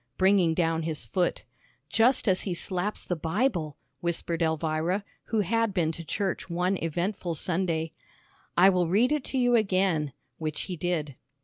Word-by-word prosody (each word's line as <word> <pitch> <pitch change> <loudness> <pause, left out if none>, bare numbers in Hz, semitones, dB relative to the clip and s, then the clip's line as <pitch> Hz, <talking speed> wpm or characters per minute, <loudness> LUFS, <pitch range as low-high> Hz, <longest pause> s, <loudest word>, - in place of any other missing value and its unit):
bringing 190 -4 +4
down 165 -1 +1
his 155 -6 -3
foot, 175 - 0 0.4
"Just 235 +2 +3
as 185 -2 +3
he 185 -3 -2
slaps 185 +4 -2
the 175 - -1
Bible," 165 - -1 0.2
whispered 170 0 -2
Elvira, 160 +4 0 0.2
who 225 -2 +1
had 225 +1 0
been 165 -3 +2
to 165 +1 -7
church 190 +3 -2
one 180 +3 +1
eventful 175 +1 -2
Sunday. 165 -1 -1 0.7
"I 180 +2 +8
will 180 -2 +1
read 220 - +3
it 300 -3 +1
to 270 - -3
you 245 -1 +3
again," 185 - +1 0.3
which 155 -1 -3
he 185 - -4
did. 155 -5 -2
175 Hz, 155 wpm, -28 LUFS, 160-195 Hz, 0.7 s, I